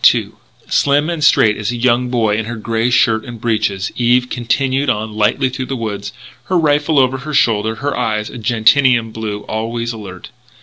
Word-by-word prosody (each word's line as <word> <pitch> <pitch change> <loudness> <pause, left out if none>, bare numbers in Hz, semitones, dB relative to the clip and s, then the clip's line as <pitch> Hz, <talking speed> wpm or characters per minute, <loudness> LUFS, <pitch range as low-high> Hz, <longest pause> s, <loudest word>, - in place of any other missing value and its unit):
II - - -3 0.4
Slim 145 +3 +2
and 165 -3 -3
straight 110 -7 +4
as 110 -1 -3
a - - -4
young 125 +1 +1
boy 115 -4 +1
in 110 0 -2
her 120 +1 -5
grey 115 +1 -1
shirt 115 -3 +2
and 120 -2 -9
breeches, 110 -4 -1
Eve 125 +1 +2
continued 135 +3 0
on 110 -2 -2
lightly 110 +6 +1
through 130 0 -5
the 135 - -3
woods, 105 -4 -5 0.3
her 185 - 0
rifle 150 -1 +1
over 130 0 +2
her 150 +3 -5
shoulder, 110 -2 +2
her 140 +4 -3
eyes 110 -3 -1
of 120 - -9
gentian 115 +1 +3
blue 110 -2 -5
always 115 +2 -4
alert. 95 -5 -10
120 Hz, 185 wpm, -16 LUFS, 110-130 Hz, 0.4 s, straight